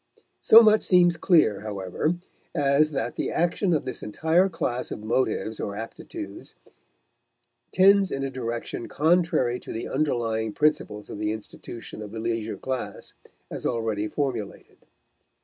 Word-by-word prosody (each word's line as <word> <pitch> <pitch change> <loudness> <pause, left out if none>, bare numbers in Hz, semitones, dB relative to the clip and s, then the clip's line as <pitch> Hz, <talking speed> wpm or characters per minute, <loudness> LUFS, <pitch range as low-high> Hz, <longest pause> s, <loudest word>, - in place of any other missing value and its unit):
So 230 +1 +8
much 215 0 +5
seems 175 -2 +4
clear, 160 - +3
however, 105 - -2 0.4
as 145 0 +3
that 130 -5 -3
the - - -2
action 175 +3 0
of 155 -5 +1
this 130 - -5
entire 160 - +2
class 125 -8 -3
of 105 - -6
motives 110 -1 -1
or 100 - -4
aptitudes 315 - -8 1.2
tends 195 0 +5
in 135 - -3
a 135 - -3
direction 120 -2 -4
contrary 160 -6 +2
to - - -9
the 115 - -4
underlying 115 -7 -1
principles 125 -9 0
of - - -7
the 105 0 -1
institution 110 +1 -8
of 105 0 -8
the 115 - -5
leisure 115 -1 -2
class 130 -1 -5 0.4
as - - -6
already 110 -3 -1
formulated. 120 -7 -4
130 Hz, 140 wpm, -25 LUFS, 110-165 Hz, 1.2 s, So